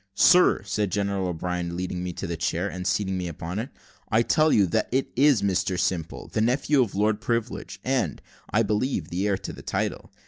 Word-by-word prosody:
"Sir," 180 - +5
said 105 -1 -1
General 100 -2 0
O'Brien, 90 0 -3
leading 90 0 -3
me 90 - -3
to - - -5
the 85 - -3
chair, 85 +2 -1
and 90 -2 -5
seating 95 -2 0
me 90 - -3
upon 85 +4 -5
it, 120 +5 -4 0.4
"I 115 +1 +3
tell 155 +5 +3
you 100 - +5
that 110 +5 0 0.3
is 135 -5 +4
Mr 95 -2 0
Simple, 85 -2 -2
the 110 - -2
nephew 135 +4 +2
of 115 -6 -1
Lord 105 +1 +1
Privilege; 115 0 -3
and, 125 - 0 0.3
I 115 - +2
believe 105 - -1
the 95 +4 -1
heir 100 -2 +1
to - - -7
the - - -10
title. - - -3
100 Hz, 200 wpm, -25 LUFS, 90-115 Hz, 0.4 s, Sir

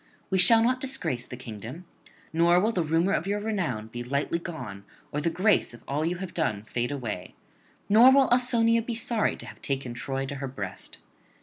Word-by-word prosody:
We 190 - +2
shall 225 +4 +7
not 255 +2 +1
disgrace 165 - -3
the 125 - -8
kingdom; 120 - -8 0.5
nor 170 +2 +4
will 215 +5 +2
the 185 - 0
rumour 165 +4 +1
of 175 - -1
your 205 +1 0
renown 180 - -2
be 120 +2 -6
lightly 140 +6 -1
gone 160 -13 -7 0.3
or 150 - -2
the 170 - +1
grace 185 - +2
of 120 - -17
all 145 +3 -1
you 170 +2 0
have 180 0 -6
done 110 -11 -1
fade 120 +2 -2
away; 115 -10 -5 0.5
nor 230 +5 +8
will 270 0 +5
Ausonia 235 -2 +3
be 230 +1 -4
sorry 230 -1 0
to - - -11
have - - -12
taken 135 -3 -3
Troy 135 +2 -3
to 140 - -5
her 135 - -2
breast. 105 -8 -6
165 Hz, 200 wpm, -27 LUFS, -, 0.5 s, nor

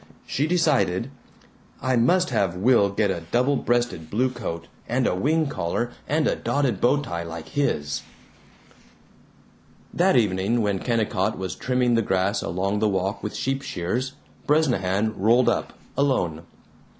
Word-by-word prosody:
She 145 +4 -1
decided, 140 - +1 0.7
"I 130 0 0
must 180 +11 +3
have 95 -3 +1
Will 100 +1 +4
get 100 0 +1
a 85 - -3
double 125 +4 +2
breasted 120 -12 -1
blue 125 +7 +1
coat 85 -9 -5 0.2
and - - +1
a - - +2
wing 155 - +1
collar 120 - -2 0.2
and 150 +2 +2
a - - +1
dotted 135 -9 -1
bow 145 +4 +3
tie 85 -10 -4
like 85 -1 -7
his." 75 - -1 1.9
That 180 -3 +3
evening, 105 +1 +1
when 100 -2 0
Kennicott 110 -3 0
was 95 -1 -4
trimming 125 -1 +1
the 115 - +3
grass 95 0 0
along 95 +4 -1
the 110 0 +2
walk 95 +1 -1
with 105 - -5
sheep 135 +1 -1
shears, 125 +6 -3 0.3
Bresnahan 110 -9 +2
rolled 115 +5 +4
up, - - -1 0.2
alone. 90 - 0
115 Hz, 145 wpm, -24 LUFS, 95-130 Hz, 1.9 s, Will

